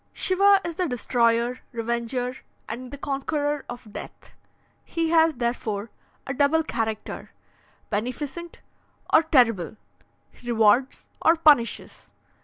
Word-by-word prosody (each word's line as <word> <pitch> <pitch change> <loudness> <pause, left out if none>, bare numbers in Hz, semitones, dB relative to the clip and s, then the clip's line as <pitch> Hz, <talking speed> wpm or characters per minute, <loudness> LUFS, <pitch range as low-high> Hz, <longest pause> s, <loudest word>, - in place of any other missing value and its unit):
"Shiva 395 +1 +4
is 335 -2 -5
the 365 - 0
destroyer, 240 -1 +1
revenger, 235 +2 -2 0.3
and 250 +3 -6
the 285 - -8
conqueror 290 +1 -2
of 240 -3 -9
Death. - - -10 0.5
He 330 -1 -2
has, 325 -2 +4
therefore, 230 -3 -3 0.3
a 270 - -3
double 290 +4 +3
character, 220 -7 -4 0.6
beneficent 270 +10 -4 0.5
or 315 - +8
terrible; 235 - +2 0.6
he 245 - -11
rewards 230 +3 +2
or 325 - +5
punishes. 295 -8 +2
255 Hz, 110 wpm, -25 LUFS, 235-315 Hz, 0.6 s, or